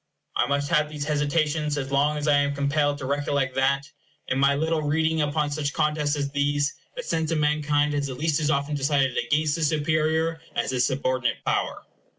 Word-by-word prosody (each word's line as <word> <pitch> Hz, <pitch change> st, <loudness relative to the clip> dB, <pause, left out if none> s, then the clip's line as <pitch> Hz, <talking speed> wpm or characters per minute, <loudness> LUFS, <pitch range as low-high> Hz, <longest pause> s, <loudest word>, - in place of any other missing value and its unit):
I -, -, +2 dB
must 140 Hz, 0 st, -1 dB
have 150 Hz, -2 st, +3 dB
these 150 Hz, -1 st, -5 dB
hesitations 150 Hz, 0 st, 0 dB
as 135 Hz, -1 st, -4 dB
long 145 Hz, +2 st, +2 dB
as 150 Hz, 0 st, -3 dB
I 145 Hz, -1 st, +5 dB
am 145 Hz, 0 st, +1 dB
compelled 145 Hz, +1 st, +1 dB
to 140 Hz, -, -6 dB
recollect 140 Hz, -1 st, 0 dB
that, 140 Hz, +1 st, +1 dB, 0.4 s
in 130 Hz, -, 0 dB
my 140 Hz, +1 st, +4 dB
little 160 Hz, +2 st, 0 dB
reading 160 Hz, +2 st, +1 dB
upon 150 Hz, 0 st, 0 dB
such 145 Hz, -1 st, -2 dB
contests 150 Hz, -2 st, 0 dB
as 140 Hz, -1 st, -2 dB
these, 145 Hz, 0 st, 0 dB, 0.2 s
the -, -, -5 dB
sense 160 Hz, -, -1 dB
of 165 Hz, -, 0 dB
mankind 150 Hz, 0 st, +1 dB
has 145 Hz, -1 st, -1 dB
at 130 Hz, -, -6 dB
least 155 Hz, +1 st, +1 dB
as 150 Hz, -1 st, 0 dB
often 140 Hz, 0 st, 0 dB
decided 140 Hz, -2 st, +1 dB
against 155 Hz, 0 st, +1 dB
the 165 Hz, -, -1 dB
superior 160 Hz, +1 st, +1 dB
as -, -, -1 dB
the 130 Hz, -, -1 dB
subordinate 130 Hz, 0 st, 0 dB
power. -, -, -1 dB
145 Hz, 195 wpm, -25 LUFS, 140-155 Hz, 0.4 s, I